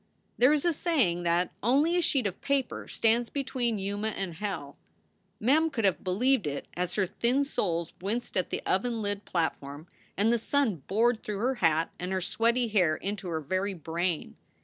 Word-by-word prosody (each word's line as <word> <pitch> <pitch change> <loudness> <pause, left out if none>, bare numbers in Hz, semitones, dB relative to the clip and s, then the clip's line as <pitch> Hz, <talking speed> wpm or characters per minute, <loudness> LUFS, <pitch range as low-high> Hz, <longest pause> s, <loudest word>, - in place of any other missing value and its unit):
There 255 +4 +5
is 300 0 +2
a 345 - +3
saying 265 - +1
that 175 +2 +1
"only 285 - +3
a 355 - +3
sheet 275 -7 +2
of 190 -3 -3
paper 275 -2 -1
stands 230 +1 +1
between 250 -5 -1
Yuma 205 +2 -2
and 195 -5 -3
hell." 160 -6 -5 0.6
Mem 305 +8 +3
could 225 -8 -1
have 190 -3 +1
believed 220 - +2
it 140 -1 -4
as 180 0 -2
her 205 - +2
thin 245 +9 +1
soles 170 - -2
winced 220 +6 -2
at 185 - 0
the - - -3
oven 230 +3 0
lid 205 0 -2
platform, 155 -3 -2 0.3
and 215 +4 +3
the 235 - +2
sun 245 -5 +1
bored 225 +3 +2
through 210 -1 -4
her 250 +6 +1
hat 165 -1 +2
and 180 +1 -4
her 190 - +1
sweaty 235 +6 +1
hair 180 -8 +3
into 200 +1 -4
her 160 -2 -2
very 185 +5 -1
brain. 170 +1 -2
205 Hz, 185 wpm, -29 LUFS, 180-245 Hz, 0.6 s, There